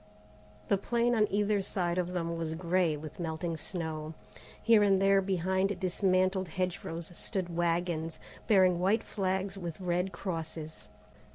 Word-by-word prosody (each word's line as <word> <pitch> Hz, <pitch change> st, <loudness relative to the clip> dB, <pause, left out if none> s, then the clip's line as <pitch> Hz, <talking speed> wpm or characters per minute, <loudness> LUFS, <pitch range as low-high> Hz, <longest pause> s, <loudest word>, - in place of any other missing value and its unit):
The 200 Hz, -, +2 dB
plain 235 Hz, +3 st, +1 dB
on 215 Hz, -2 st, +3 dB
either 205 Hz, 0 st, +1 dB
side 180 Hz, -2 st, -1 dB
of 180 Hz, 0 st, -2 dB
them 170 Hz, -1 st, -2 dB
was 165 Hz, -1 st, -3 dB
grey 170 Hz, -2 st, +1 dB
with 155 Hz, +3 st, -9 dB
melting 165 Hz, 0 st, -2 dB
snow. 160 Hz, -2 st, -4 dB, 0.4 s
Here 225 Hz, -2 st, +5 dB
and 195 Hz, -2 st, +4 dB
there 195 Hz, 0 st, +4 dB
behind 190 Hz, +1 st, 0 dB
dismantled 185 Hz, 0 st, +1 dB
hedge 180 Hz, +2 st, -2 dB
rows 170 Hz, +1 st, -5 dB
stood 180 Hz, -4 st, -3 dB
wagons, 170 Hz, -1 st, 0 dB, 0.3 s
bearing 185 Hz, -4 st, +5 dB
white 195 Hz, +5 st, +2 dB
flags 190 Hz, 0 st, -2 dB
with 170 Hz, -2 st, -5 dB
red 180 Hz, +1 st, 0 dB
crosses. 160 Hz, -, -5 dB
180 Hz, 145 wpm, -31 LUFS, 165-195 Hz, 0.4 s, Here